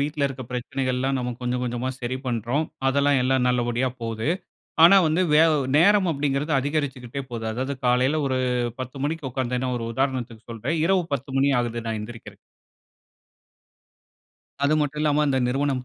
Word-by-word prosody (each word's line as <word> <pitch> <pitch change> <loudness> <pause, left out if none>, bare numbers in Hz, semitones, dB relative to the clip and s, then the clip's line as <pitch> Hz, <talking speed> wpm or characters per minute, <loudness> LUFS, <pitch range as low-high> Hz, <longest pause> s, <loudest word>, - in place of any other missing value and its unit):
வீட்டில 145 0 0
இருக்க 135 -1 -6
பிரச்சனைகள் 130 +1 -2
எல்லாம் 135 +1 0
நம்ம 125 0 -2
கொஞ்சம் 125 0 -2
கொஞ்சமா 120 +1 -2
சரி 125 +1 -2
பண்ணுறோம். 120 +6 -1 0.2
அதெல்லாம் 140 0 +3
எல்லாம் 130 -1 +2
நல்லபடியா 125 +1 +1
போது. 115 +3 -3 0.6
ஆனா 195 +3 +8
வந்து 160 +4 +2
வே 150 - +6 0.4
நேரம் 195 +2 +5
அப்டிங்குறது 145 +1 -1
அதிகரிச்சுகிட்டே 140 -3 -3
போது. 115 -1 -5
அதாவது 130 +4 -3
காலையில 130 +5 +2
ஒரு 130 0 0 0.4
10 130 +2 -6
மணிக்கு 155 -2 -2
உக்காந்தேன்னா 125 0 -2
ஒரு 115 - -4
உதாரணத்துக்கு 125 -4 -2
சொல்றேன். 155 +9 -2
இரவு 185 -1 +2
10 135 0 -5
மணி 140 +1 +3
ஆகுது 120 -1 -3
நான் 110 -1 -2
எந்திரிக்கிறதுக்கு. 115 +2 -10 2.3
அது 145 +2 +3
மட்டும் 150 0 -2
இல்லாம, 150 0 +2
இந்த 135 -1 +2
நிறுவனம் 135 0 -1
130 Hz, 150 wpm, -24 LUFS, 125-145 Hz, 2.3 s, ஆனா